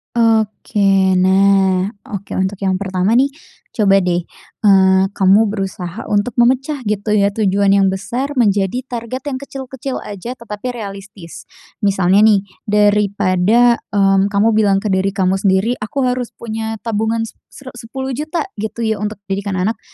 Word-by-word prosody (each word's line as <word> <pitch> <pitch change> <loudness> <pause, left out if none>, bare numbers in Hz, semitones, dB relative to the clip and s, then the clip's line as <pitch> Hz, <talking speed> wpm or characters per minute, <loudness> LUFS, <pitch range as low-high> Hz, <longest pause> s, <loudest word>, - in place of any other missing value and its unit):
Oke, 205 -4 +2
nah 190 0 +3 0.2
oke, 200 -1 -7
untuk 190 +1 -2
yang 190 -1 0
pertama 190 +2 0
nih, 275 +3 +3 0.4
coba 195 -3 +3
deh, 175 -1 +1 0.4
eee, 190 -2 +4
kamu 200 +3 +4
berusaha 195 -1 -5
untuk 205 +4 0
memecah 260 +3 +1
gitu 210 0 -1
ya 200 -1 +2
tujuan 200 -1 +1
yang 195 -1 +4
besar 200 +8 -2
menjadi 210 0 +1
target 240 +2 -5
yang 260 - -4
kecil-kecil 265 -1 -6
aja 210 +5 -7
tetapi 230 -1 -7
realistis, 200 -4 -9 0.3
misalnya 195 -2 +2
nih 205 -2 +3 0.2
daripada, 205 +2 +3 0.2
mmm, 195 0 +3
kamu 205 +2 +2
bilang 205 -3 +2
ke 210 - -1
diri 190 +1 0
kamu 190 -1 +1
sendiri, 195 +5 +1
"Aku 215 +6 -3
harus 250 -1 -1
punya 225 -1 -5
tabungan 225 0 -1
se 225 - -10
sere 265 -2 -12
Rp10.000.000," 270 +7 -4 0.2
gitu 220 +2 -4
ya 220 -2 -1
untuk 210 +1 -3 0.2
didikan 200 0 -2
anak, 210 +5 -1
205 Hz, 145 wpm, -17 LUFS, 195-230 Hz, 0.4 s, eee